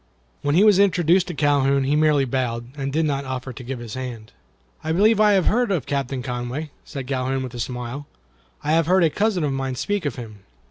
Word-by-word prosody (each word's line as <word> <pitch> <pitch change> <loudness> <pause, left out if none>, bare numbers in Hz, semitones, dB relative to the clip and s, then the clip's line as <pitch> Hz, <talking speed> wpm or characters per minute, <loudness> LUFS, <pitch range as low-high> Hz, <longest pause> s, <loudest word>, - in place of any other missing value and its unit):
When 145 +1 +1
he 190 - +6
was 210 -3 +6
introduced 180 -2 +3
to 175 - -5
Calhoun 140 -1 +2
he 140 +2 +1
merely 150 -2 +3
bowed, 120 -2 -2
and 140 -1 -3
did 160 +3 +1
not 140 -2 -1
offer 130 -1 -5
to 125 - -9
give 130 +2 -5
his 120 -2 -8
hand. 125 -4 -6 0.5
"I 160 - -2
believe 210 +5 +4
I 210 -1 +5
have 190 -3 +3
heard 240 +1 +2
of 175 -10 -1
Captain 135 -2 -2
Conway," 125 +4 -4
said 135 -4 -7
Calhoun, 130 0 -1
with 130 -1 -7
a 120 - -7
smile. 125 +4 -5 0.6
"I 150 - 0
have 165 0 +3
heard 185 0 +4
a 160 - +3
cousin 205 -1 0
of 145 -2 0
mine 135 -1 -2
speak 205 +7 -2
of 145 - -2
him." 110 -4 -9
140 Hz, 225 wpm, -22 LUFS, 130-165 Hz, 0.6 s, he